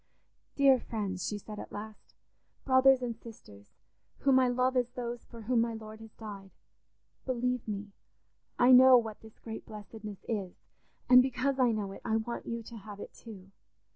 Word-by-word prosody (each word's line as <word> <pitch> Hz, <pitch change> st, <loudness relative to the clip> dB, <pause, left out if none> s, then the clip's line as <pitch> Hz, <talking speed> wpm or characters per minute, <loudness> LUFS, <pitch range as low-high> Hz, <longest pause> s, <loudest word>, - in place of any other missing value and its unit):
"Dear 275 Hz, -2 st, +5 dB
friends," 200 Hz, -6 st, -4 dB
she 210 Hz, -, -2 dB
said 210 Hz, +1 st, -9 dB
at -, -, -9 dB
last, 215 Hz, +1 st, -9 dB, 0.5 s
"brothers 260 Hz, -1 st, +5 dB
and 235 Hz, -2 st, -3 dB
sisters, 105 Hz, -, -14 dB, 0.5 s
whom 270 Hz, -2 st, +5 dB
I 255 Hz, -, +4 dB
love 255 Hz, +1 st, +1 dB
as 245 Hz, -1 st, +1 dB
those 240 Hz, -2 st, -6 dB
for 230 Hz, -1 st, -12 dB
whom 235 Hz, +1 st, +2 dB
my 230 Hz, -1 st, -1 dB
Lord 215 Hz, 0 st, -9 dB
has 225 Hz, -1 st, -13 dB
died, 200 Hz, -3 st, -9 dB, 0.7 s
believe 250 Hz, -1 st, -1 dB
me, 205 Hz, -1 st, -5 dB, 0.7 s
I 245 Hz, +1 st, +5 dB
know 255 Hz, 0 st, +9 dB
what 225 Hz, -3 st, -3 dB
this 220 Hz, -1 st, -15 dB
great 220 Hz, -1 st, -8 dB
blessedness 210 Hz, -1 st, -10 dB
is; 200 Hz, -5 st, -3 dB, 0.5 s
and 250 Hz, 0 st, +9 dB
because 265 Hz, +1 st, -1 dB
I 250 Hz, -2 st, +4 dB
know 210 Hz, -3 st, -3 dB
it, 195 Hz, -, -10 dB
I 220 Hz, -2 st, 0 dB
want 225 Hz, +2 st, -3 dB
you 230 Hz, 0 st, -4 dB
to 230 Hz, +1 st, -10 dB
have 205 Hz, -1 st, -10 dB
it -, -, -9 dB
too. 195 Hz, -4 st, -12 dB
230 Hz, 175 wpm, -31 LUFS, 210-250 Hz, 0.7 s, know